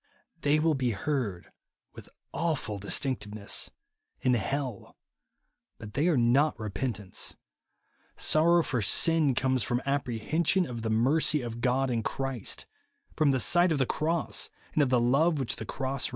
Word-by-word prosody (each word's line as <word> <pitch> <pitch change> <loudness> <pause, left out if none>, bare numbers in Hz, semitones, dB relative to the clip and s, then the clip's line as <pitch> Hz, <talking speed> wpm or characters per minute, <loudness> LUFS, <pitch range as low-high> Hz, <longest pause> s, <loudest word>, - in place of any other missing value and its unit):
They 145 +1 +3
will 160 +1 +2
be 130 -4 0
heard 105 -5 -3 0.4
with - - -12 0.2
awful 155 -11 -2
distinctness 105 -1 -1 0.5
in 125 - +2
hell; 125 0 -3 0.8
but 105 -1 -10
they 150 +5 +1
are 165 -6 +3
not 125 +6 +3
repentance. 105 -1 -4 0.8
Sorrow 170 +2 +3
for 125 -6 -1
sin 155 - +3
comes 130 -1 +1
from 120 +3 0
"apprehension 140 - 0
of 120 -5 -6
the 110 - -2
mercy 135 +6 +2
of 120 0 -6
God 130 +1 +1
in 115 -2 0
Christ," 135 -1 -4 0.5
from 155 -2 +3
the 130 -1 +2
sight 175 +6 +4
of 155 - +1
the 130 - +2
cross 160 +5 -1 0.2
and 155 - +2
of 140 - +2
the 125 -1 +3
love 145 +7 +3
which 130 - -2
the 110 - -6
cross 135 0 -2
reveals. - - 0
130 Hz, 150 wpm, -29 LUFS, 115-150 Hz, 0.8 s, sight